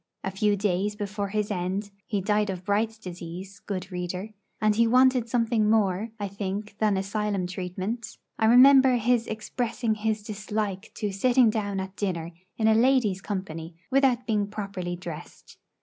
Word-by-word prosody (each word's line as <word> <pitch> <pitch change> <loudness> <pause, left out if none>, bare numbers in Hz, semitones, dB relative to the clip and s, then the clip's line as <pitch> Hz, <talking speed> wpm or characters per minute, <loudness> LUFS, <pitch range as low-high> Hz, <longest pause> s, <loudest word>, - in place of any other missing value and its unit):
A 190 - -2
few 205 +2 +2
days 200 +1 0
before 205 0 -3
his 210 +1 -2
end 195 +2 -2 0.2
he 205 -3 -1
died 210 +1 +1
of 185 -1 -5
Bright's 220 +2 0
disease, 185 0 -8
good 190 -1 -5
reader; 180 +3 -4 0.3
and 215 0 +3
he 230 +1 +4
wanted 255 0 +4
something 230 -3 +2
more, 210 -1 +2
I 205 - -2
think, 200 +1 -5
than 210 -3 +2
asylum 200 -1 -1
treatment 185 +5 -5 0.2
I 220 - +4
remember 260 +2 +7
his 240 0 +2
expressing 225 +1 -2
his 215 0 -1
dislike 210 -1 -4
to 210 -2 -2
sitting 240 +3 +4
down 205 -3 -2
at 190 0 -6
dinner 170 -5 -2 0.3
in 220 - +2
a 220 - +6
lady's 225 -5 +3
company 175 -5 -5 0.2
without 260 -2 +3
being 210 -3 0
properly 195 -4 -4
dressed. 175 -3 -10
210 Hz, 160 wpm, -26 LUFS, 190-220 Hz, 0.3 s, remember